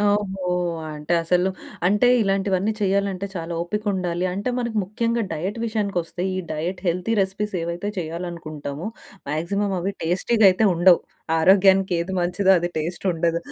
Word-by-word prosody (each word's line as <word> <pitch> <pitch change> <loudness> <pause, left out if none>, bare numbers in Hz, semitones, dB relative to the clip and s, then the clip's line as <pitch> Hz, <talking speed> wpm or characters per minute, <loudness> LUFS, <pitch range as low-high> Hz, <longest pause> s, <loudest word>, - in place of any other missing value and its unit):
ఓహో! 205 -2 0 0.5
అంటే 150 +3 -1
అసలు 180 +3 +2 0.4
అంటే 210 +5 +3
ఇలాంటివన్నీ 195 0 +1
చేయాలంటే 200 -1 0
చాలా 170 -1 -4
ఓపికుండాలి. 185 -2 -2
అంటే 200 +6 -3
మనకి 235 -2 -2
ముఖ్యంగా 230 +3 -1
డైట్ 190 +8 -3
విషయానికి 210 -4 -1
వస్తే 175 +2 -7
ఈ - - -3
డైట్ 165 +4 -3
హెల్తీ 180 +6 0
రెసిపీస్ 195 +2 -1
ఏవైతే 170 +4 -3
చేయాలనుకుంటామో, 160 -2 -5 0.4
మాక్సిమం 195 +7 -1
అవి 195 +3 -2
టేస్టీ‌గా 195 +6 +1
అయితే 185 +4 +1
ఉండవు. 175 +1 +6 0.4
ఆరోగ్యానికి 190 +2 +5
ఏది 175 +3 -3
మంచిదో 185 +3 +1
అది 175 +1 -1
టేస్ట్ 165 +4 -4
ఉండదు. 170 0 0
185 Hz, 140 wpm, -23 LUFS, 170-200 Hz, 0.5 s, ఉండవు